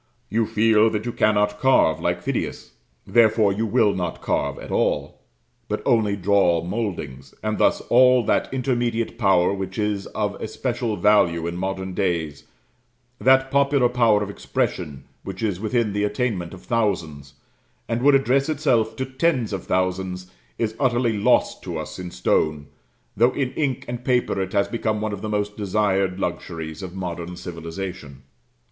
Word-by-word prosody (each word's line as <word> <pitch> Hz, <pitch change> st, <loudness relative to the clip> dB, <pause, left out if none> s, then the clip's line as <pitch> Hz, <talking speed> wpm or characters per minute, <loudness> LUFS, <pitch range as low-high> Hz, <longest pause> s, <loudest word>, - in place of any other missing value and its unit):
You 115 Hz, 0 st, +1 dB
feel 110 Hz, 0 st, +4 dB
that 110 Hz, 0 st, -3 dB
you 120 Hz, -, -2 dB
cannot 105 Hz, -2 st, +1 dB
carve 130 Hz, -11 st, +3 dB
like -, -, -1 dB
Phidias; -, -, -3 dB, 0.3 s
therefore 110 Hz, -3 st, +4 dB
you 110 Hz, +3 st, -1 dB
will 105 Hz, 0 st, +3 dB
not 90 Hz, -3 st, -3 dB
carve 70 Hz, -1 st, -1 dB
at -, -, -9 dB
all, -, -, -1 dB, 0.5 s
but -, -, -3 dB
only 110 Hz, -3 st, +2 dB
draw 95 Hz, -4 st, +2 dB
mouldings; 85 Hz, -, -5 dB
and 110 Hz, 0 st, -1 dB
thus -, -, +3 dB
all 125 Hz, 0 st, +5 dB
that -, -, +1 dB
intermediate 120 Hz, -3 st, -1 dB
power 95 Hz, -4 st, +3 dB
which 95 Hz, -1 st, -5 dB
is 105 Hz, -2 st, -1 dB
of 105 Hz, -2 st, -3 dB
especial 120 Hz, 0 st, -2 dB
value 85 Hz, -6 st, +3 dB
in 85 Hz, 0 st, -3 dB
modern 95 Hz, +1 st, -3 dB
days, 80 Hz, -6 st, -2 dB, 0.7 s
that 130 Hz, +1 st, +4 dB
popular 140 Hz, -2 st, +3 dB
power 115 Hz, -4 st, +3 dB
of 100 Hz, -, -5 dB
expression 75 Hz, -7 st, -3 dB, 0.2 s
which 95 Hz, +2 st, -6 dB
is 100 Hz, -5 st, -1 dB
within 110 Hz, 0 st, 0 dB
the 105 Hz, 0 st, 0 dB
attainment 105 Hz, -6 st, -2 dB
of 90 Hz, -, -15 dB
thousands, 80 Hz, -, -2 dB, 0.5 s
and 115 Hz, +1 st, -1 dB
would 140 Hz, +1 st, +5 dB
address 135 Hz, +2 st, +2 dB
itself 130 Hz, -8 st, +1 dB
to 130 Hz, -, -2 dB
tens 130 Hz, -4 st, 0 dB
of 95 Hz, -, -4 dB
thousands, 95 Hz, 0 st, -2 dB, 0.3 s
is 110 Hz, -2 st, -1 dB
utterly 120 Hz, -4 st, +1 dB
lost 100 Hz, -, +2 dB
to -, -, -5 dB
us -, -, -6 dB
in 90 Hz, -1 st, -5 dB
stone, 75 Hz, -3 st, 0 dB, 0.5 s
though 120 Hz, +5 st, +3 dB
in 130 Hz, -2 st, -1 dB
ink 135 Hz, -5 st, -2 dB
and 120 Hz, 0 st, -5 dB
paper 125 Hz, -6 st, +1 dB
it 95 Hz, -, -4 dB
has 100 Hz, -1 st, +2 dB
become 110 Hz, -2 st, -1 dB
one 110 Hz, 0 st, -2 dB
of 100 Hz, -, -6 dB
the 110 Hz, -, -4 dB
most 105 Hz, 0 st, -2 dB
desired 100 Hz, -2 st, 0 dB
luxuries 80 Hz, -1 st, -4 dB
of 95 Hz, -1 st, -7 dB
modern 90 Hz, -1 st, -5 dB
civilization. 85 Hz, -5 st, -7 dB
105 Hz, 160 wpm, -23 LUFS, 90-120 Hz, 0.7 s, all